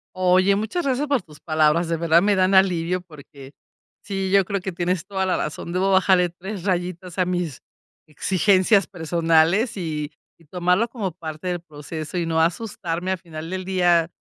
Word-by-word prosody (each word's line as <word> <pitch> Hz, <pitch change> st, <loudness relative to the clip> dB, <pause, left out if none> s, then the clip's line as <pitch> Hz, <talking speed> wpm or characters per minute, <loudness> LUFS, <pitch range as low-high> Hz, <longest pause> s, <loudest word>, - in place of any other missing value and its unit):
Oye, 185 Hz, +1 st, +3 dB
muchas 220 Hz, -, -2 dB
gracias 275 Hz, +2 st, 0 dB
por 280 Hz, -4 st, +1 dB
tus 150 Hz, -4 st, -17 dB
palabras, 155 Hz, +1 st, +2 dB
de 165 Hz, -, 0 dB
verdad 165 Hz, 0 st, +3 dB
me 205 Hz, -, +3 dB
dan 185 Hz, +1 st, +3 dB
alivio, 180 Hz, -1 st, +3 dB
porque 140 Hz, -5 st, -14 dB, 0.5 s
sí, 195 Hz, -2 st, -3 dB
yo 195 Hz, 0 st, +5 dB
creo 200 Hz, +1 st, -2 dB
que 190 Hz, +1 st, -5 dB
tienes 175 Hz, 0 st, -2 dB
toda 190 Hz, -1 st, -2 dB
la 185 Hz, -, +1 dB
razón, 150 Hz, +3 st, -4 dB
debo 185 Hz, +2 st, +1 dB
bajarle 190 Hz, -2 st, +4 dB
3 185 Hz, +2 st, -8 dB
rayitas 180 Hz, -1 st, -3 dB
a 185 Hz, -, +3 dB
mis 175 Hz, -6 st, -3 dB, 0.5 s
exigencias 190 Hz, +5 st, +2 dB
personales, 170 Hz, +5 st, +1 dB
y 155 Hz, -4 st, -4 dB, 0.4 s
tomarlo 180 Hz, +5 st, +1 dB
como 215 Hz, -6 st, -4 dB
parte 160 Hz, 0 st, -7 dB
del 175 Hz, -, -2 dB
proceso 155 Hz, +1 st, -7 dB
y 170 Hz, -, 0 dB
no 160 Hz, 0 st, +1 dB
asustarme 175 Hz, 0 st, -2 dB
a 190 Hz, -, 0 dB
final 165 Hz, -2 st, -9 dB
del 185 Hz, 0 st, -4 dB
día. 175 Hz, -3 st, +2 dB
180 Hz, 175 wpm, -22 LUFS, 165-190 Hz, 0.5 s, yo